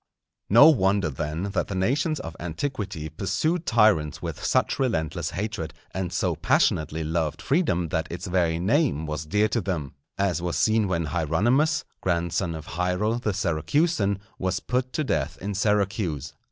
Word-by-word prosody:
No 120 +9 +9
wonder, 100 - +3
then, 75 +5 -3
that 95 - -1
the 100 - -4
nations 140 - +1
of 80 0 -7
antiquity 95 - -4
pursued 155 - -1
tyrants 95 - +3
with 85 -2 -6
such - - +1
relentless 95 - -1
hatred, 95 -7 -4 0.2
and 95 -1 -3
so - - 0
passionately 80 +1 +1
loved 80 -1 -1
freedom 135 - +1
that 80 +1 -1
its 85 - -5
very 85 -3 +1
name 100 - +1
was 75 0 -4
dear 105 +6 +2
to 115 - 0
them, 85 -7 -3 0.2
as 95 -4 0
was 85 -1 -2
seen 110 -1 +3
when 85 -3 0
Hieronymus, 105 - +1 0.2
grandson 85 0 0
of 80 -1 -7
Hiero 90 +7 -1
the 110 - -1
Syracusan, 100 - +1 0.2
was 95 0 -1
put 125 0 -1
to 155 - 0
death 135 - -1
in 100 +2 -4
Syracuse. 95 - 0
95 Hz, 155 wpm, -25 LUFS, 80-110 Hz, 0.2 s, No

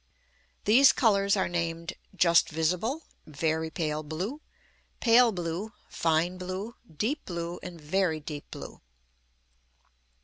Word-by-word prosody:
These 250 +6 +7
colours 200 -3 +3
are 190 - +1
named 170 0 -3 0.2
"just 170 -2 +4
visible," 180 - -1 0.2
"very 160 +1 -1
pale 155 -1 -2
blue," 180 - -4 0.6
"pale 240 0 +6
blue," 180 +3 -4 0.2
"fine 165 +3 +1
blue," 185 +5 -5 0.2
"deep 225 - -2
blue," 170 -1 -5
and 175 -2 -8
"very 160 +1 0
deep 150 -1 -8
blue." - - -9
175 Hz, 110 wpm, -28 LUFS, 160-205 Hz, 0.6 s, These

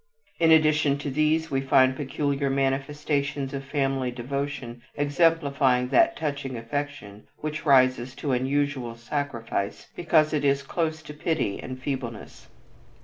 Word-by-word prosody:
In 165 -1 +4
addition 155 -3 +4
to 140 0 -4
these 155 +3 +1
we 135 -1 +1
find 130 -1 +4
peculiar 140 0 -1
manifestations 140 +1 -1
of 135 0 -4
family 135 -2 -1
devotion 125 -1 -4
exemplifying 145 -4 +2
that 335 - +4
touching 140 -4 -3
affection 115 -4 -5
which 155 +1 -5
rises 130 -2 +4
to 145 - -3
unusual 130 -1 -1
sacrifice 120 -5 -4
because 155 -3 +2
it 150 - 0
is 140 0 +2
close 160 +1 -2
to 150 - -9
pity 150 -9 -1
and 130 0 -7
feebleness. 125 -5 -6
140 Hz, 130 wpm, -26 LUFS, 130-150 Hz, -, In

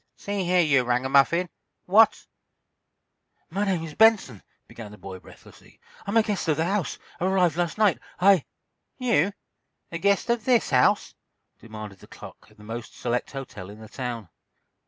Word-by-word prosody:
"See 200 -2 -3
here, 180 0 +3
you 140 -6 +3
ragamuffin, 135 +8 +2 0.4
what—" 215 +4 +4 1.3
"My 200 +4 -1
name 185 -5 -1
is 160 -2 -7
Benson," 215 - +3 0.3
began 110 -3 -10
the 105 - -12
boy, 95 0 -9
breathlessly. - - -18 0.3
"I'm 200 +3 +1
a 225 - +5
guest 205 -5 -3
of 155 - +1
the 160 - +1
house—arrived 185 -2 -1
last 175 +1 -2
night. 210 -5 +3 0.2
I—" 190 -4 +5 0.5
"You, 220 - +2 0.6
a 165 - -4
guest 200 +5 +1
of 235 -2 -1
this 245 -8 +2
house?" 125 -2 +3 0.5
demanded 110 -3 -10
the - - -16
clerk - - -13
of 105 - -24
the 105 - -15
most 115 +1 -8
select 120 0 -2
hotel 115 -9 -8
in 105 +1 -12
the 110 -1 -12
town. 120 -6 -6
165 Hz, 155 wpm, -25 LUFS, 120-200 Hz, 1.3 s, a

